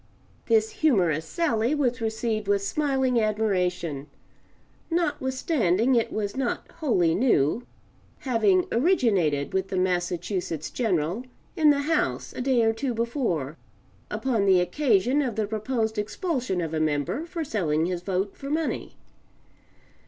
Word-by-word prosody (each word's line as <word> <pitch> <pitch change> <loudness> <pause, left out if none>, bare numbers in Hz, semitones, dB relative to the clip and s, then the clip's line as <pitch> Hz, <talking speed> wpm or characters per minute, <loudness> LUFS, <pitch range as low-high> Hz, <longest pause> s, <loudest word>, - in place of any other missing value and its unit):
[This 220 -1 +3
humorous 175 - +1
sally 245 - 0
was 250 -4 0
received 220 -1 -2
with 200 -1 +2
smiling 265 0 +1
admiration 180 -9 -1 0.8
notwithstanding 260 - +1
it 235 -2 +2
was 205 -2 -3
not 260 -2 -2
wholly 185 - +2
new, 215 - +2 0.5
having 350 - +2
originated 210 - +2
with 190 0 0
the 190 - -3
Massachusetts 175 -2 -1
General 185 -2 -1 0.3
in 310 -2 +5
the 285 -1 +3
House 320 +2 -1
a - - -5
day 250 -2 +2
or 225 0 +3
two 245 +1 -3
before, 225 - -2 0.5
upon 230 -7 0
the 190 -2 +6
occasion 250 +5 +2
of 250 -6 -2
the 220 -1 0
proposed 220 +1 -2
expulsion 235 - -2
of 165 -1 -4
a 160 - 0
member 155 - -1
for 335 -1 -4
selling 165 - 0
his 180 -1 -2
vote 190 +2 -2
for 275 - -7
money. 315 +1 -2
220 Hz, 130 wpm, -26 LUFS, 180-260 Hz, 0.8 s, the